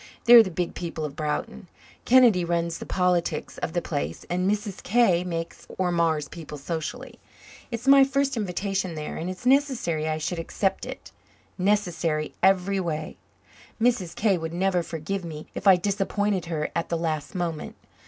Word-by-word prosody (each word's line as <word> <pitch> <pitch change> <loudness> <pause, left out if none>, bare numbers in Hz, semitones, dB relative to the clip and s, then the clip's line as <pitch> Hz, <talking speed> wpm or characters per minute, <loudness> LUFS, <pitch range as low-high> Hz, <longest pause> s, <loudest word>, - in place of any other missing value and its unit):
They're 240 0 +10
the 205 - -1
big 175 0 -3
people 165 -3 -4
of 145 -2 -6
Broughton. 180 +7 -3 0.4
Kennedy 240 -8 +6
runs 170 0 -1
the - - -8
politics 180 -4 0
of 160 - -3
the 175 -1 -1
place, 75 +3 -4
and 180 +2 +1
Mrs. 205 -2 -2
K. 195 -5 +3
makes 165 -2 -5
or 185 -1 +1
mars 165 -3 +1
people 155 -3 -9
socially. 170 - -5 0.5
It's 235 +1 -5
my 275 0 +8
first 275 0 +1
invitation 195 -3 -2
there 150 -1 -5
and 170 - -4
it's 185 +5 -8
necessary 250 - +2
I 155 - -1
should 165 +2 -3
accept 195 +3 -1
it - - -9 0.5
necessary 175 -6 0
every 195 +1 +3
way. 160 -4 -3 0.6
Mrs. 225 -7 +1
K. 200 -5 +2
would 160 0 -5
never 185 0 +1
forgive 170 +4 -4
me 155 -2 -7
if 195 - -3
I 190 - +9
disappointed 200 0 -1
her 160 -3 -3
at 170 0 -1
the 170 - 0
last 160 +1 -3
moment. 170 -4 -3
180 Hz, 165 wpm, -25 LUFS, 165-205 Hz, 0.6 s, They're